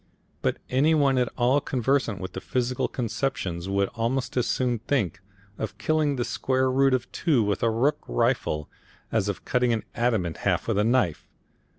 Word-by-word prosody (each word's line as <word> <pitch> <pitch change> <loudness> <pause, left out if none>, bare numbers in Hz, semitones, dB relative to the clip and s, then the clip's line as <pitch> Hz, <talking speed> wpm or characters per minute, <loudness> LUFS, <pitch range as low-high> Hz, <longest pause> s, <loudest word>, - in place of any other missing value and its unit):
But - - 0
any 145 +5 +3
one 140 -3 +3
at 125 - +1
all 130 +3 +3
conversant 130 -5 0
with 95 - -6
physical 125 0 -1
conceptions 105 -7 -3
would 100 0 +1
almost 125 +3 -2
as 125 -2 +1
soon 125 -3 0
think 100 - -1 0.4
of 110 -2 -4
killing 150 +4 +1
the 120 -2 -1
square 130 0 0
root 135 0 +4
of 120 -2 -4
2 145 -9 +2
with 100 -2 -1
a 115 - +3
rook 120 +7 +1
rifle 75 +5 0 0.4
as 105 -3 +1
of 100 - -5
cutting 125 -1 +2
an 110 - -1
atom 120 -6 +1
in 85 - -3
half - - -1
with 100 - +1
a - - +3
knife. 115 -8 +1
120 Hz, 180 wpm, -26 LUFS, 105-130 Hz, 0.4 s, root